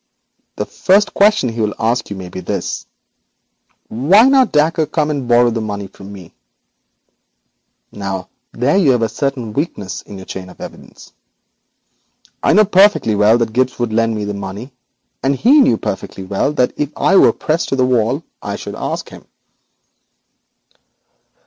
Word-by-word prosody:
The - - -3
first 200 +2 +2
question 205 - +3
he 115 0 -4
will 105 -1 -1
ask 115 +2 0
you 100 - -5
may 95 -2 -8
be 95 - -7
this: 90 - -4 1.0
"Why 160 - +4
did 265 - +4
not 265 -3 +4
Dacre 155 +1 +2
come 155 0 -1
and 140 -4 -3
borrow 120 0 +4
the 115 0 -3
money 100 -2 -4
from 95 +1 -12
me?" 95 -4 -12 1.6
Now 95 -2 -5 0.2
there 135 +9 +1
you 155 -9 +4
find 120 -2 0
a 115 - 0
certain 130 -6 -3
weakness 120 - -4
in 100 - -11
your 95 - -10
chain 95 -1 -8
of - - -16
evidence. - - -12 1.3
I - - +3
knew 215 +1 +6
perfectly 195 - +4
well 105 +3 +4
that 115 -2 -2
Gibbes 130 +1 0
would 120 -3 -2
lend 115 0 +1
me 105 -1 -3
the 105 - -3
money, 100 +6 -7 0.5
and 140 +1 +1
he 255 - +4
knew 115 - +3
perfectly 95 -1 -5
well 100 +8 -1
that 125 -4 +1
if 145 -1 -2
I 195 - +2
were - - +6
pressed 160 +2 -2
to - - 0
the 130 -1 +2
wall 125 +4 0 0.2
I - - -4
should - - -7
ask - - -4
him.' - - -13
120 Hz, 170 wpm, -17 LUFS, 105-150 Hz, 1.6 s, knew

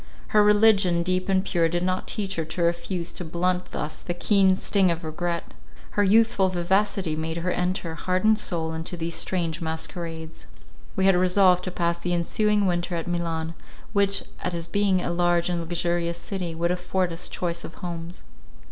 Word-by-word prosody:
Her 210 -1 +5
religion, 205 -4 +4
deep 185 +2 -1
and 190 0 +2
pure, 170 -4 +1
did 175 +1 -1
not 185 +1 -1
teach 195 -3 -2
her 165 - 0
to 170 +2 -3
refuse 170 +1 -1
to - - -6
blunt 180 +2 -1
thus 150 +1 -4
the 175 - -4
keen 190 0 +4
sting 190 0 +2
of 170 0 -2
regret; 170 +2 -3 0.4
her 205 - +2
youthful 205 -1 +4
vivacity 185 -1 0
made 160 +1 -3
her 175 +2 -1
enter, 180 -2 -1
heart 185 +3 -1
and 220 0 +5
soul, 165 -6 -2
into 160 +2 -5
these 165 0 -3
strange 170 -3 -1
masquerades. 160 - -4 0.5
We 190 - +1
had 195 -1 +5
resolved 180 0 +4
to 185 - -3
pass 170 -1 -1
the 175 0 -1
ensuing 210 +4 +1
winter 175 -1 -1
at 165 - -3
Milan, 165 -2 -2 0.4
which, 200 -1 +3 0.2
as 170 -2 -3
being 190 +1 +1
a 170 - -2
large 175 0 +2
and 175 -1 -1
luxurious 170 0 -1
city, 175 -2 -4
would 170 +1 0
afford 180 0 -1
us 165 - -3
choice 170 -1 -3
of 160 - -9
homes. 170 0 -6
175 Hz, 180 wpm, -25 LUFS, 170-190 Hz, 0.5 s, Her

